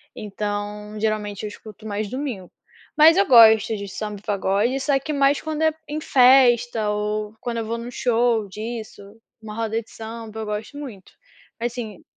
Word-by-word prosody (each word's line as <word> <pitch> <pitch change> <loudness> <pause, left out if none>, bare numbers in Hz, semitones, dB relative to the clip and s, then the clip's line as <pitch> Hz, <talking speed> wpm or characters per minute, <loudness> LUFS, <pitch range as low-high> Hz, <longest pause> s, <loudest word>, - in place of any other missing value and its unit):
Então, 210 +1 -5
geralmente, 210 -2 -2
eu - - -2
escuto 215 +1 -12
mais 205 0 -3
domingo. 255 -9 -5 0.5
Mas 320 +2 +8
eu 395 - +4
gosto 220 -2 +7
de 200 0 -6
samba, 210 0 -6
pagode 205 +4 0
só 275 0 +2
que 300 +3 -4
mais 280 0 +3
quando 315 0 -4
é 315 -1 +3
em 305 +1 -4
festa 245 -5 +4
ou 210 0 -2
quando 240 -1 -3
eu 225 - -2
vou 230 +1 -3
em 235 +1 -7
um - - -7
show 235 -3 +1
disso, 220 +2 -7 0.4
uma 215 -1 -8
roda 225 0 -2
de 220 - -21
samba, 225 0 -8
eu 220 - -4
gosto 210 +7 -5
muito. 235 -10 -9 0.5
Mas 240 +1 -2
assim 220 -6 -7
220 Hz, 180 wpm, -22 LUFS, 210-245 Hz, 0.5 s, Mas